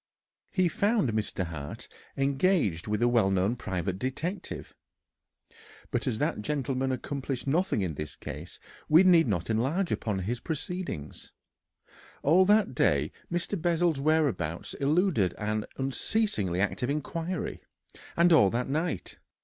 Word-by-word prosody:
He 185 -2 +2
found 200 - +1
Mr. 105 -3 -1
Hart 75 -4 -7 0.3
engaged 135 - +1
with 105 +2 0
a - - +5
well 115 -5 +3
known 95 +4 +1
private 95 -4 -3
detective, 155 - -4 1.2
but 120 -1 -1
as 115 -4 0
that 105 - -1
gentleman 135 0 -1
accomplished 130 -1 -3
nothing 155 - +1
in 85 -4 -2
this 75 -2 -6
case, - - -8 0.3
we 160 +4 +7
need 175 -5 +6
not 90 -6 -1
enlarge 145 - 0
upon 105 -3 -1
his 110 +6 -2
proceedings. 160 - -5 0.9
All 175 +6 +5
that 210 -4 +4
day 75 - +2 0.2
Mr. 175 +1 -2
Bessel's 170 -3 +1
whereabouts 140 - 0
eluded 145 - +2
an 105 0 -2
unceasingly 135 - 0
active 105 +5 0
inquiry, 165 +4 -3 0.6
and 170 0 +5
all 105 -11 +6
that 120 +4 -1
night. 160 +4 -2
135 Hz, 130 wpm, -28 LUFS, 105-170 Hz, 1.2 s, we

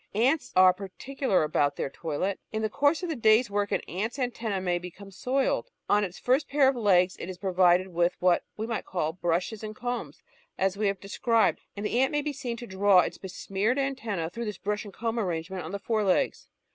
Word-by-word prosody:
Ants 265 +8 +2
are 185 0 +7
particular 200 - -1
about 145 -2 +1
their 135 - -3
toilet. 170 +5 -3
In 220 0 -2
the 215 - -1
course 290 +7 +2
of 355 - -2
the 320 - -1
day's 220 -1 +4
work 205 0 0
an - - +1
ant's 215 +8 -4
antenn® 230 -7 -2
may 175 -1 +1
be 180 +1 -7
come 195 +3 -13
soiled. 265 - 0 0.2
On 210 0 +3
its 185 -2 -5
first 265 +4 +1
pair 275 -1 +4
of 270 - +3
legs 190 -5 +3
it 175 - -6
is 185 - -6
provided 185 -1 +3
with 175 0 +1
what 180 -1 +3
we 220 - -2
may 230 -1 -2
call 160 -4 -2
brushes 180 +5 -1
and 215 0 -6
combs, 245 +1 -5 0.3
as 190 0 +1
we 210 +1 0
have 195 -1 -1
described, 225 +3 +1 0.2
and 205 - -4
the 235 - +1
ant 265 - +3
may 295 -1 0
be 300 0 -2
seen 245 -4 -4
to 240 - -7
draw 190 -2 +4
its - - -4
besmeared 195 +5 -2
antennas 225 -12 -2
through 235 0 -4
this 210 -4 -4
brush 210 +2 -3
and 200 - -10
comb 230 0 -2
arrangement 180 -1 -3
on - - -7
the 200 - -2
fore 215 +1 -1
legs. 190 -2 +1
205 Hz, 220 wpm, -28 LUFS, 185-240 Hz, 0.3 s, are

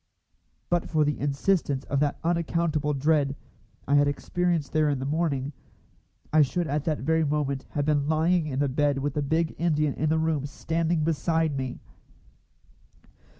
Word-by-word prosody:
But 175 -1 0
for 155 -2 +2
the 150 - -1
insistence 145 0 0
of 140 - -1
that 145 0 0
unaccountable 165 -3 0
dread 140 0 +2 0.5
I 140 - +1
had 145 0 +5
experienced 170 +1 -1
there 155 -1 +3
in 140 - 0
the 130 - -4
morning, 145 -2 -1 0.8
I 155 - +6
should 170 +5 +1
at 150 -1 -2
that 155 -2 -1
very 160 +4 +2
moment 140 -2 -1
have 145 -1 0
been 145 -2 +1
lying 160 +1 +2
in 135 -3 -3
the 140 +1 +2
bed 145 +1 +1
with 140 +1 -2
the 150 - -1
big 160 +3 0
Indian 150 -4 +1
in 155 - -1
the 160 - +2
room 160 -3 0
standing 165 +2 -1
beside 160 -1 0
me. 130 -2 -4
150 Hz, 165 wpm, -26 LUFS, 140-160 Hz, 0.8 s, I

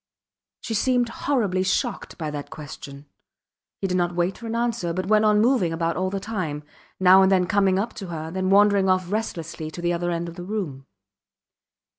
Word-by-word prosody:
She 230 - -4
seemed 245 +2 +2
horribly 220 -8 0
shocked 190 0 -1
by 155 -3 -4
that 145 -1 -6
question. 140 -1 -9 0.8
He - - -1
did 185 -1 0
not 175 -1 0
wait 175 +2 0
for 230 - -7
an 225 - -3
answer, 230 -8 -1
but 185 +2 -2
went 215 +2 +3
on 210 -1 +4
moving 225 -7 +3
about 165 0 -1
all 185 +1 0
the 195 +1 -3
time; 185 -8 -4 0.4
now 190 +1 +7
and 190 0 +4
then 185 -2 +4
coming 195 0 +2
up 210 +4 -2
to 195 - -6
her, 160 -1 -5
then 185 +1 -1
wandering 200 -1 +5
off 185 -1 +1
restlessly 170 -7 -3
to 160 - -9
the 175 0 0
other 175 +1 -1
end 170 0 -2
of 170 +1 -9
the 175 - -6
room. 175 -10 -4
185 Hz, 200 wpm, -24 LUFS, 170-205 Hz, 0.8 s, now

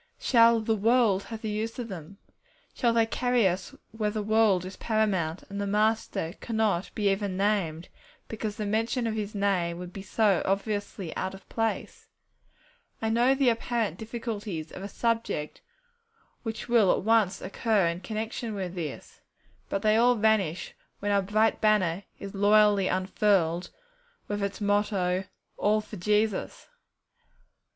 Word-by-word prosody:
Shall 230 -2 +5
'the 220 0 0
world' 220 -2 +3
have 225 -1 -8
the 220 - -2
use 220 +2 -3
of 245 -2 -4
them? 190 -1 -9 0.6
Shall 240 -3 +2
they 230 -1 +3
carry 245 -1 +2
us 185 +1 -3 0.2
where 215 -1 -1
the 210 0 -3
world 215 -4 +3
is 185 - -7
paramount, 195 -7 0
and 200 0 -5
the 200 - -2
Master 210 -5 0
cannot 220 -6 0
be 205 -2 +2
even 195 -1 -2
named, 190 -5 0 0.4
because 215 -1 -4
the 215 -2 -3
mention 225 +4 0
of 225 - -1
His 215 -1 -4
Name 185 -4 0
would 180 0 -8
be 195 - -7
so 200 -2 +2
obviously 200 -3 -2
out 190 +1 -3
of 195 - -15
place? 225 -1 -3 0.9
I 220 - -1
know 245 +4 +4
the 270 -2 +3
apparent 230 -5 -1
difficulties 215 -7 -5
of - - -8
a 200 - -5
subject 225 -9 -2 0.8
which 225 0 -5
will 230 -6 +4
at - - 0
once 215 -3 +3
occur 205 0 +1
in 170 +1 -1
connection 220 +2 -4
with 185 -3 -4
this, 165 -6 -7 0.5
but 195 - -2
they 215 0 +4
all 245 +2 +5
vanish 210 -6 +1 0.2
when 205 0 -2
our 200 0 +3
bright 215 +3 +1
banner 200 -4 +2
is 200 -1 -8
loyally 205 -1 +4
unfurled, 185 -2 +1 0.6
with 205 0 -3
its 200 0 -3
motto, 200 -3 +1 0.3
'All 210 +1 +2
for 215 0 -8
Jesus!' 210 +2 0
210 Hz, 155 wpm, -28 LUFS, 190-225 Hz, 0.9 s, Shall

